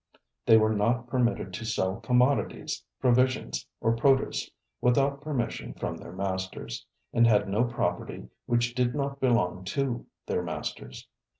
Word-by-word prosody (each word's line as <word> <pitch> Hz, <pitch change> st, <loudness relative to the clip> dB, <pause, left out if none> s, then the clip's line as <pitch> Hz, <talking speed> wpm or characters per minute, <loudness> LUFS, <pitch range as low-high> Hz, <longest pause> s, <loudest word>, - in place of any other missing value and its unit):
They 110 Hz, -, +8 dB
were 110 Hz, 0 st, +3 dB
not 115 Hz, +4 st, +1 dB
permitted 120 Hz, -6 st, 0 dB
to 115 Hz, -, -5 dB
sell 95 Hz, -3 st, 0 dB
"commodities, 125 Hz, +3 st, +1 dB, 0.2 s
provisions, 130 Hz, 0 st, +2 dB
or 115 Hz, 0 st, +2 dB
produce" 135 Hz, +3 st, +2 dB, 0.3 s
without 140 Hz, +3 st, +2 dB
permission 145 Hz, -6 st, -3 dB
from -, -, -3 dB
their -, -, -10 dB
masters, 95 Hz, -8 st, -4 dB, 0.3 s
and 115 Hz, 0 st, +5 dB
had 105 Hz, -2 st, +4 dB
no 105 Hz, +5 st, +2 dB
property 120 Hz, 0 st, -2 dB, 0.2 s
which 120 Hz, 0 st, +1 dB
did 125 Hz, 0 st, +1 dB
not 140 Hz, -1 st, -2 dB
belong 105 Hz, -9 st, +2 dB
to 125 Hz, +3 st, -2 dB, 0.2 s
their -, -, 0 dB
masters. 65 Hz, -, -6 dB
120 Hz, 135 wpm, -28 LUFS, 105-130 Hz, 0.3 s, They